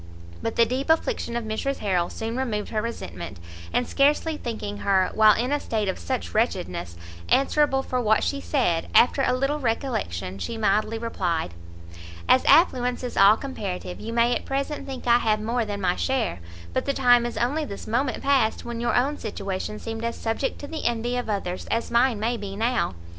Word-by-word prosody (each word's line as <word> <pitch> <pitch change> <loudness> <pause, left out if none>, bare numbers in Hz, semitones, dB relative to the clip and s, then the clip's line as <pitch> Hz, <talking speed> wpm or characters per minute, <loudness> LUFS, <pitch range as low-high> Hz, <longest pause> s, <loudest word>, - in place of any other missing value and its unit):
but 225 - -3
the 230 - +5
deep 260 +5 -3
affliction 320 - +1
of 235 - -3
Mrs 220 +6 -2
Harrel 180 -4 0
soon 225 +1 -4
removed 230 -5 -2
her 215 - -1
resentment, 95 - -6 0.3
and 245 - +1
scarcely 295 +3 +2
thinking 220 -6 -5
her, 195 -2 +2
while 215 -1 +6
in 245 +4 -1
a 290 - +2
state 215 -6 -2
of 190 - -2
such 260 -2 -3
wretchedness, 90 - -1 0.3
answerable 275 0 +3
for 255 -1 -1
what 215 -2 +3
she 280 -1 -1
said, 175 - 0
after 250 +3 +5
a 255 - +2
little 275 +4 0
recollection, 225 - -2
she 230 - -4
mildly 215 +1 +1
replied 175 - -2 0.7
"As 260 - +5
affluence 250 -7 +4
is 250 - -4
all 200 +3 +7
comparative, 200 -9 -5
you 225 - -6
may 235 +1 +3
at - - -3
present 275 +2 -3
think 265 -2 -6
I 240 0 +5
have 215 -2 +1
more 230 +2 -1
than 205 -1 -4
my 180 -1 +1
share; 260 - -1 0.3
but - - 0
the 280 - 0
time 245 -3 +5
is 240 - -4
only 280 +7 0
this 200 -9 -7
moment 255 +4 -1
past, 270 -6 +2
when 235 -1 -4
your 240 - +1
own 280 +4 +1
situation 200 -1 -4
seemed 225 +1 -6
as 235 0 -2
subject 225 +4 -2
to 285 - -6
the 315 0 -5
envy 240 +1 0
of 245 -2 -3
others 185 -3 -3
as 230 - -1
mine 235 -1 +3
may 235 +3 0
be 200 -2 -6
now. 230 - 0
235 Hz, 195 wpm, -25 LUFS, 210-260 Hz, 0.7 s, all